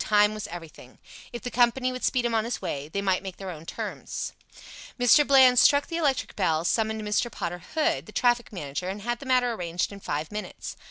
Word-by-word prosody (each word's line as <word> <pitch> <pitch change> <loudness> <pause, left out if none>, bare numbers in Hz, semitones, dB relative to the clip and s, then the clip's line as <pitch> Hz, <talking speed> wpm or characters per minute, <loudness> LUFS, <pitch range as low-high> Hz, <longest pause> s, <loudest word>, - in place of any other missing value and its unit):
Time 210 0 +4
was 215 -1 -5
everything. 165 -7 -11 0.3
If 240 - -7
the 245 - -4
company 250 +1 +2
would 255 0 -6
speed 250 -2 +1
him 235 - 0
on 220 -1 +2
his 235 +2 -3
way, 140 +1 -4
they 200 +6 -3
might 190 -2 +1
make 190 -2 -7
their 190 -2 -6
own 165 -1 -10
terms. - - -5 0.7
Mr. 245 +5 +6
Bland 260 -3 +7
struck 285 0 +5
the 330 - -4
electric 285 -6 0
bell, 165 -4 +1
summoned 220 +2 0
Mr. 210 +3 0
Potter 175 -3 -4
Hood, 165 - +1
the - - -10
traffic 240 +1 +1
manager, 175 -1 -4
and 200 +1 -6
had 240 +1 -2
the 275 - -9
matter 250 -2 +3
arranged 175 -3 -2
in 200 - -9
five 150 -3 -4
minutes. 210 0 -6
215 Hz, 215 wpm, -26 LUFS, 180-245 Hz, 0.7 s, Bland